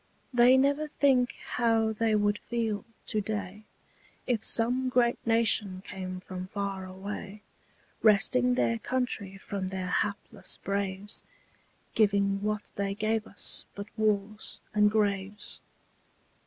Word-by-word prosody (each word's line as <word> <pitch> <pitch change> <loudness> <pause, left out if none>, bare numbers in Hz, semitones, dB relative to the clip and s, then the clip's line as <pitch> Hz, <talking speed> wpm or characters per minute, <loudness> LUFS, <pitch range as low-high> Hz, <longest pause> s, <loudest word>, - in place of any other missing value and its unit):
They 245 +2 +7
never 285 +3 +2
think 265 -4 +2
how 225 -2 +2
they 220 0 +1
would 205 0 +2
feel 225 -4 -2 0.2
to 215 - 0
day, 205 0 -4 0.6
If 235 -4 0
some 250 +3 +3
great 245 -1 +2
nation 215 -4 +2
came 185 -1 -5
from 185 0 -6
far 195 -1 -4
away, 200 +2 -7 0.6
Wresting 125 - +4
their 115 -2 +1
country 235 -7 -2
from 195 0 -4
their 185 -1 -3
hapless 200 +2 -2
braves, 200 0 -2 0.7
Giving 200 -2 +2
what 210 0 -2
they 200 0 -1
gave 220 +1 0
us - - -1
but 200 - -5
wars 215 -1 -1
and 210 0 +5
graves. 205 -1 -1
205 Hz, 120 wpm, -29 LUFS, 195-225 Hz, 0.7 s, They